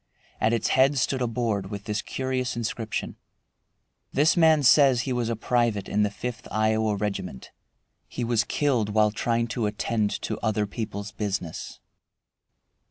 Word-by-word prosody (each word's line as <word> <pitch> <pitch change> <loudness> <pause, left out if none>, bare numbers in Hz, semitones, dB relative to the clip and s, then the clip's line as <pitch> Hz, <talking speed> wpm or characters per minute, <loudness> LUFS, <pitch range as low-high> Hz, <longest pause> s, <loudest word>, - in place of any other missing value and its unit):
At 110 - +2
its 115 -2 0
head 135 +2 +4
stood 130 0 0
a 125 - +1
board 110 -4 -1
with 100 -1 -6
this 105 0 -2
curious 130 +1 -2
inscription: 115 -1 -3 0.9
"This 150 +4 +3
man 160 -3 +5
says 135 -2 +6
he 130 0 -2
was 120 -2 -1
a 115 - 0
private 115 -3 0
in 105 - 0
the 105 - +2
Fifth 125 +4 -6
Iowa 110 0 +1
Regiment. 100 -9 -4 0.6
He 125 - -4
was 115 -2 +2
killed 125 -5 0
while 105 0 +3
trying 115 +2 0
to 115 -2 -1
attend 105 0 -1
to - - -3
other 110 -2 0
people's 100 -1 -5
business." 95 -6 -4
115 Hz, 155 wpm, -26 LUFS, 105-125 Hz, 0.9 s, says